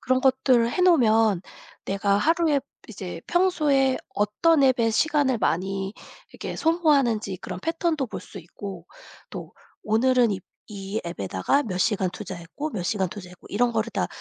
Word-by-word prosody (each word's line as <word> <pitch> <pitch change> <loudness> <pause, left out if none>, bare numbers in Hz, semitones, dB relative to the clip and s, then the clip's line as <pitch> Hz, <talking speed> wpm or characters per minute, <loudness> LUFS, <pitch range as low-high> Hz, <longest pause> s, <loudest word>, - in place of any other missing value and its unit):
그런 255 +1 +1
것들을 260 -3 +3
해 365 - -2
놓으면 225 - +4 0.4
내가 200 +1 +1
하루에 320 +1 +2 0.3
이제 185 -6 -7
평소에 300 -8 +2 0.2
어떤 275 +10 +2
앱에 250 -4 +3
시간을 280 0 +2
많이 195 +2 -1 0.4
이렇게 - - -6
소모하는지 275 - +2
그런 180 - -6
패턴도 330 -4 -1
볼 - - -7
수 195 - -10
있고 180 +1 -9 0.4
또 - - -8 0.3
오늘은 240 +2 +3
이 195 - -4 0.3
이 200 +1 -5
앱에다가 100 - 0
몇 200 -8 -4
시간 190 0 +1
투자했고 190 - -6
몇 210 -9 -4
시간 190 -1 0
투자했고 180 -3 -11
이런 240 +4 +2
거를 225 0 -1
다 - - 0
225 Hz, 315 characters per minute, -25 LUFS, 195-275 Hz, 0.4 s, 놓으면